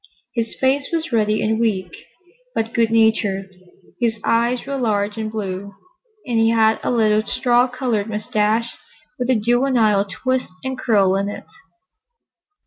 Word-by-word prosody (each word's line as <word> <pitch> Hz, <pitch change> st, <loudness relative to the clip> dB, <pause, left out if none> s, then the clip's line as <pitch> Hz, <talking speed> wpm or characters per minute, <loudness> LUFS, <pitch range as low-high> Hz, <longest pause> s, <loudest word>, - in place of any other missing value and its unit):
His 230 Hz, -2 st, -2 dB
face 275 Hz, +2 st, +1 dB
was 330 Hz, -3 st, -2 dB
ruddy 215 Hz, -2 st, +1 dB
and 220 Hz, +1 st, 0 dB
weak, 190 Hz, -7 st, -1 dB, 0.6 s
but 225 Hz, +1 st, -2 dB
good 230 Hz, -1 st, +2 dB
natured: 215 Hz, -4 st, +1 dB, 0.5 s
his 230 Hz, -2 st, 0 dB
eyes 235 Hz, +2 st, +1 dB
were 280 Hz, 0 st, -3 dB
large 210 Hz, -5 st, 0 dB
and 220 Hz, -1 st, -4 dB
blue, 200 Hz, -2 st, -5 dB, 0.5 s
and 240 Hz, -4 st, 0 dB
he 225 Hz, 0 st, +4 dB
had 220 Hz, -1 st, +3 dB
a -, -, -2 dB
little 215 Hz, -3 st, +3 dB
straw 245 Hz, +3 st, +2 dB
colored 245 Hz, -4 st, -2 dB
moustache, 215 Hz, +2 st, 0 dB, 0.4 s
with 250 Hz, 0 st, -2 dB
a 260 Hz, -, +4 dB
juvenile 230 Hz, -3 st, +2 dB
twist 255 Hz, -2 st, -2 dB
and 260 Hz, 0 st, -3 dB
curl 200 Hz, -7 st, +2 dB
in 200 Hz, +1 st, -1 dB
it. -, -, -8 dB
225 Hz, 145 wpm, -20 LUFS, 210-245 Hz, 0.6 s, he